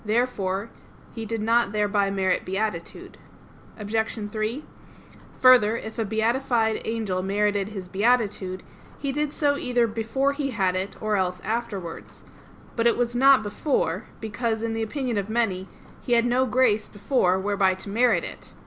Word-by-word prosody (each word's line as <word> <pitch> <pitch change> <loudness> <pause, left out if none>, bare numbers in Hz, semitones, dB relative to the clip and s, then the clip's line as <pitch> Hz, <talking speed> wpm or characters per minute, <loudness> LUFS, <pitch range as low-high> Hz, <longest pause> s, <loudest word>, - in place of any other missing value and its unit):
Therefore 210 -3 -1 0.4
he 225 -2 -6
did 225 0 -3
not 230 -1 +2
thereby 205 -1 +1
merit 190 -2 0
beatitude. 190 -2 -4 0.6
Obj. 220 +2 -2
3: 220 +7 -3 0.8
Further, 245 -4 +6
if 220 0 -7
a 225 - +1
beatified 225 +1 +1
angel 220 -5 -2
merited 205 +1 0
his 195 -4 -7
beatitude, 200 -2 0 0.3
he 280 -1 -2
did 295 +1 -1
so 285 -1 +1
either 245 -3 +1
before 230 +5 -1
he 280 -1 -2
had 190 -6 0
it, 190 +2 -4
or 215 -1 0
else 180 -1 -1
afterwards. 210 -6 -5 0.5
But 230 0 +2
it 235 - +3
was 240 0 -1
not 270 -1 +6
before; 205 - -1
because, 220 +1 -2
in 230 -1 -1
the 225 - -2
opinion 240 -1 -2
of 200 +1 -5
many, 200 -5 0 0.3
he 245 - -1
had 235 0 +4
no 250 +2 +2
grace 225 -3 +2
before 205 -3 +1
whereby 195 -1 +1
to 190 - -9
merit 225 -3 +3
it. - - -9
220 Hz, 155 wpm, -25 LUFS, 200-240 Hz, 0.8 s, Further